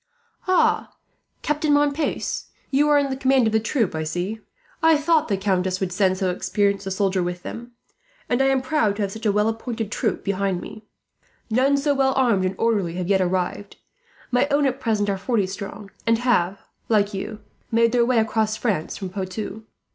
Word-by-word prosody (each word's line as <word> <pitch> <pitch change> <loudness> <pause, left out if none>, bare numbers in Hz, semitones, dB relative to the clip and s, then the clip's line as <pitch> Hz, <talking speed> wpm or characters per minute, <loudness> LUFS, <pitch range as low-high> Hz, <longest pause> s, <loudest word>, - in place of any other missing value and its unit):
"Ah, 370 -1 +2 0.5
Captain 300 0 0
Montpace, 290 +1 0 0.3
you 290 +2 +3
are 295 - +5
in 275 -2 +1
command 265 -2 +3
of 220 - +1
the 220 - +4
troop, 220 -3 0
I 160 - -2
see. 180 +7 -3 0.4
I 320 -1 +5
thought 315 +1 +2
the 200 - 0
countess 185 -1 0
would 190 -2 -2
send 185 0 +2
so 185 -1 0
experienced 200 +1 0
a - - -1
soldier 190 -1 0
with 175 0 -4
them, 240 +1 -8 0.5
and 245 +2 +1
I 270 - +4
am 265 -1 +2
proud 255 -7 +1
to 210 - -2
have 195 - -2
such 220 +2 -4
a - - +4
well 210 +1 +2
appointed 225 -1 -3
troop 220 -3 -1
behind 195 -2 -1
me. 215 +3 -10 0.6
None 265 +5 +3
so 285 +1 +1
well 270 -1 +2
armed 235 -8 +2
and 185 +1 -1
orderly 205 -7 0
have 180 0 -3
yet 195 -1 +3
arrived. 185 +2 -2 0.6
My 250 +3 +3
own 285 0 +2
at 265 0 0
present 215 -4 0
are 195 -1 -1
forty 210 0 +1
strong, 200 +1 -7 0.2
and 230 0 +4
have, 200 -6 +1 0.3
like 210 -2 +2
you, 210 +2 -5 0.3
made 230 0 +3
their 240 -1 +3
way 245 0 +2
across 220 -1 +1
France 200 -10 -2
from 190 - -5
Poitou. 195 +3 -5
215 Hz, 195 wpm, -23 LUFS, 195-255 Hz, 0.6 s, are